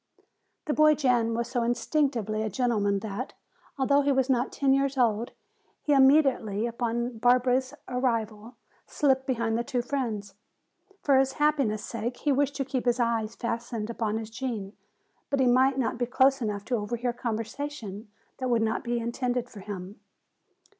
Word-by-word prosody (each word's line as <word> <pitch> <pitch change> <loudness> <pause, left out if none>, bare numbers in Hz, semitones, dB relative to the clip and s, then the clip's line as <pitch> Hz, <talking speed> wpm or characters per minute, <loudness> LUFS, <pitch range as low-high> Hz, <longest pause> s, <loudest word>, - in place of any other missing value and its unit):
The 300 - 0
boy 305 0 +5
Jan 240 -5 +2
was 235 0 -1
so 245 0 -1
instinctively 235 -3 0
a 220 - -1
gentleman 205 -3 +1
that, 220 +4 -5 0.4
although 280 +1 +3
he 285 0 +2
was 265 0 +2
not 250 0 +1
ten 275 -1 +2
years 275 0 +1
old, 230 -2 +1 0.5
he 295 - +2
immediately 265 -7 +4
upon 235 0 -2
Barbara's 255 +3 +2
arrival 230 -3 -2 0.3
slipped 265 -2 +1
behind 230 -3 0
the - - -1
two 250 -2 -2
friends. 225 -7 -3 0.7
For 275 -2 +5
his 270 0 +1
happiness' 280 -8 +1
sake 235 +2 -4
he 295 - 0
wished 280 +1 +1
to 275 - -2
keep 255 -1 -3
his 245 0 +2
eyes 230 -2 0
fastened 235 -1 -3
upon 220 -2 -1
his 220 0 -6
Gene, 225 -5 -4 0.6
but 280 - 0
he 260 - +4
must 260 +2 +4
not 245 -2 -1
be 245 - 0
close 265 +1 +3
enough 205 -2 -3
to 245 +1 0
overhear 240 +3 -2
conversation 230 -2 -5 0.3
that 255 -1 -2
would 235 -2 +2
not 220 0 -1
be 240 -1 -1
intended 245 +1 -2
for 210 - -10
him. 195 0 -7
245 Hz, 165 wpm, -27 LUFS, 225-265 Hz, 0.7 s, boy